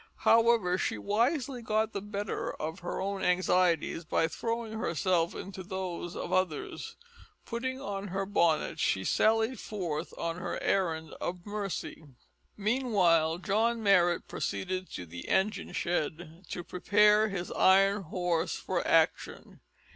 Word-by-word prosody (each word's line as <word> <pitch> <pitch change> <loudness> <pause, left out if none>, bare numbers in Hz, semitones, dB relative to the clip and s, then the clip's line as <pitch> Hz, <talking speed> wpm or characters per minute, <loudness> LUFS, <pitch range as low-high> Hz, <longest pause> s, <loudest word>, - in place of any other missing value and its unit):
However, 225 -6 +4
she - - -1
wisely 245 - 0
got 220 0 0
the 200 - -3
better 205 0 -3
of 160 +4 -5
her 175 -1 -4
own 195 0 -2
anxieties 180 -2 +2
by 160 0 +1
throwing 230 +3 -3
herself 170 -1 0
into 190 0 -7
those 180 -2 -5
of - - -4
others. 185 -5 -2 0.5
Putting 260 +3 -3
on 200 -6 -4
her 195 +1 -2
bonnet 170 -5 +1
she 95 - +1
sallied 225 - +2
forth 175 -6 -4
on 165 0 -3
her 180 - -4
errand 160 -5 0
of 175 0 -4
mercy. 205 -5 -4 0.5
Meanwhile 195 -8 +2
John 220 +4 0
Marrot 175 -4 +3
proceeded 185 0 -3
to 90 - -5
the 85 +1 -9
engine 210 +3 0
shed 170 +1 -3
to 175 - -4
prepare 210 +4 +4
his 180 -3 -4
iron 195 +2 +4
horse 175 0 -1
for - - -2
action. - - +1
190 Hz, 130 wpm, -30 LUFS, 170-210 Hz, 0.5 s, However